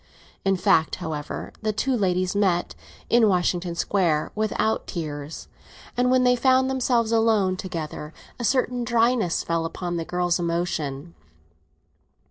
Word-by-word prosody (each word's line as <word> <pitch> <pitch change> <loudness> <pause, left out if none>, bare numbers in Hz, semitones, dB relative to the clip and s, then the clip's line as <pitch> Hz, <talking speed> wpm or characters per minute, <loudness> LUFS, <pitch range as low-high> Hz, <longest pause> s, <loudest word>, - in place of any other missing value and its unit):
In 195 0 +2
fact, 180 -4 +2
however, 155 -4 -5
the 215 -1 0
two 255 +5 0
ladies 185 -4 +1
had 200 - 0
met, 175 -3 +1 0.3
in 230 -2 +4
Washington 175 -1 0
Square, 170 -4 +1
without 215 +1 -1
tears, 150 -3 -6 0.5
and 250 0 +2
when 255 0 +4
they 250 0 +4
found 260 +1 +3
themselves 245 -3 +1
alone 220 -5 +3
together 160 -4 -6 0.3
a - - -4
certain 250 0 +1
dryness 235 -6 +2
fell 165 -1 -1
upon 175 +1 -4
the 165 - -2
girl's 180 0 0
emotion. 170 -3 -2
185 Hz, 135 wpm, -24 LUFS, 170-230 Hz, 0.5 s, in